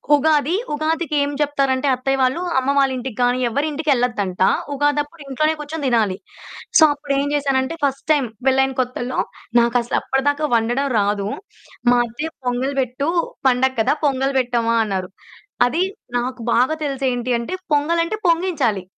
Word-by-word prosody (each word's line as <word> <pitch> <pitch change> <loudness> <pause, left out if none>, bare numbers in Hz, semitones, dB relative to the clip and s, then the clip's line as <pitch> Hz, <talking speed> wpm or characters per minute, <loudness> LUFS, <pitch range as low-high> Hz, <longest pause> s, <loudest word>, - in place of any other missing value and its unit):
ఉగాది, 300 +1 +2 0.2
ఉగాదికి 310 +1 -1
ఏం 285 - 0
చెప్తారంటే 275 -2 +1
అత్తయ్య 270 +2 -1
వాళ్ళు, 260 +6 +1 0.2
అమ్మ 260 +1 +2
వాళ్ళింటికి 260 -3 -1
గానీ, 245 +1 +2
ఎవ్వరింటికెళ్ళద్దంట, 250 - -1 0.3
ఉగాదప్పుడు 290 +3 -1
ఇంట్లోనే 305 +4 +1
కూర్చొని 300 +1 -5
దినాలి. 220 -6 +1 0.6
సో, 320 - +7
అప్పుడేం 285 -1 -1
జేసానంటే, 275 +1 0
ఫస్ట్ 275 -1 -1
టైమ్ 285 -5 +3 0.2
పెళ్ళైన 265 0 +3
కొత్తల్లో, 250 0 -3 0.4
నాకసలప్పడదాకా 265 +5 +1
వండడం 240 +5 +1
రాదు. 200 0 0 0.6
మా 245 - +4
అత్తయ్య 295 +8 -5
పొంగల్ 250 +3 -1
బెట్టూ, 255 +3 -3 0.4
"పండగ 260 +1 +3
కదా 225 - +2
పొంగల్ 270 -1 +1
పెట్టమ్మా" 235 -2 0
అన్నారు. 190 -3 -3 0.6
అది 325 +9 0 0.3
నాకు 250 +1 -3
బాగా 255 +6 +3
తెలిసి 275 -2 -2
ఏంటి 245 0 -2
అంటే, 235 +9 -5 0.2
పొంగలంటే 335 +6 +1
పొంగించాలి. 330 - +1
270 Hz, 130 wpm, -20 LUFS, 245-290 Hz, 0.6 s, సో